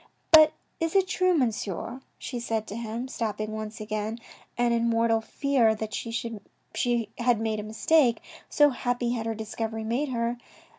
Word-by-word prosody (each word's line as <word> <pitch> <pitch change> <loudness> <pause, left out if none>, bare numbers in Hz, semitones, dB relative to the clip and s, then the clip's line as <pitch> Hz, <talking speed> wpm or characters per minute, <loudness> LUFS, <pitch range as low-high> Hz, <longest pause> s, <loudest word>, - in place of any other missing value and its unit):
" - - -43
But 310 -1 +9 0.3
is 330 +2 -1
it 385 -1 +4
true, 370 -2 +2
Monsieur," 230 - -2 0.2
she 245 - -5
said 225 -2 -2
to 205 - -7
him, 230 +2 -4
stopping 215 -3 -3
once 215 0 -5
again, 215 +1 -3 0.4
and 240 -1 +2
in 235 0 +2
mortal 230 -1 +2
fear 235 -1 +2
that 215 0 -5
she 230 - -4 1.1
had 240 -2 +3
made 220 -1 -1
a - - -4
mistake, 235 +4 +3 0.3
so 295 -1 +5
happy 245 -1 -1
had 230 -2 -2
her 225 - -1
discovery 220 0 -4
made 245 +6 -1
her. 235 -1 -1
230 Hz, 165 wpm, -27 LUFS, 220-250 Hz, 1.1 s, But